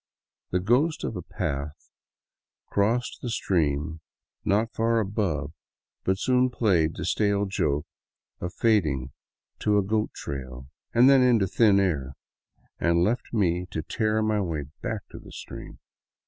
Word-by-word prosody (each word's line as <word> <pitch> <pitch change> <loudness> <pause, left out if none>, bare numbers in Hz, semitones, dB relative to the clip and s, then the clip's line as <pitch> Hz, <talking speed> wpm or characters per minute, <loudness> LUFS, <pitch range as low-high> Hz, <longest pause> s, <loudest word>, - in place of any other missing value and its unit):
The 90 - +1
ghost 125 - +2
of - - -3
a 90 - -4
path 70 -2 -5 0.8
crossed 115 +4 0
the 125 - -3
stream 80 -6 0 0.4
not 110 +3 +1
far 115 0 +2
above, 95 -9 -1 0.5
but 95 0 +1
soon 125 +4 +2
played 95 -10 +2
the - - -4
stale 100 -1 +1
joke 75 -7 0 0.5
of 90 - -4
fading 75 - +1 0.5
to 105 -1 +2
a 100 - +3
goat 105 +2 0
trail, 65 -2 -6 0.3
then 130 +3 +7
into 120 -5 +4
thin 100 +1 +4
air, 70 -9 0 0.7
and 85 0 +3
left 120 +6 -1
me 90 -5 +1
to 80 - -4
tear 110 +2 0
my 110 -1 +1
way 80 -6 -2 0.2
back - - -3
to - - -9
the - - -13
stream. - - -9
100 Hz, 140 wpm, -26 LUFS, 80-110 Hz, 0.8 s, then